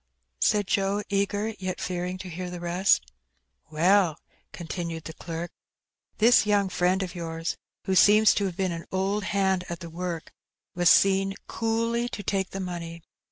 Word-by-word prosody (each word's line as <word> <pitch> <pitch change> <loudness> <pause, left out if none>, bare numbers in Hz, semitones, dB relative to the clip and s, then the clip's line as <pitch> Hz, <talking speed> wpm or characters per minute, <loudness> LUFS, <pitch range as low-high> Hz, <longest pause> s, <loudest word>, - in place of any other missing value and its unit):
said 210 -1 +2
Joe, 200 +2 0
eager, 205 +2 0
yet 185 -1 -4
fearing 180 0 -3
to 185 - -8
hear 180 +1 -5
the 175 0 -6
rest. 175 +3 +1 0.6
"Well," 170 +1 +3 0.3
continued 170 -1 -5
the 160 - -7
clerk, 170 +1 -6 0.7
"this 235 +3 +6
young 200 -2 +2
fiiend 185 +1 +1
of 180 -2 -6
yours, 165 -2 -4 0.3
who 190 - 0
seems 210 +3 +6
to 205 - 0
have 185 -2 -4
been 190 -2 0
an 165 0 -6
old 195 +2 -1
hand 190 -2 +1
at 170 - -5
the 170 -2 -9
work, 170 -1 -5 0.4
was 175 -1 +3
seen 195 +1 +4
coolly 230 +1 -1
to 205 - -6
take 195 0 -1
the 195 - -6
money. 170 -3 -6
185 Hz, 160 wpm, -26 LUFS, 175-200 Hz, 0.7 s, this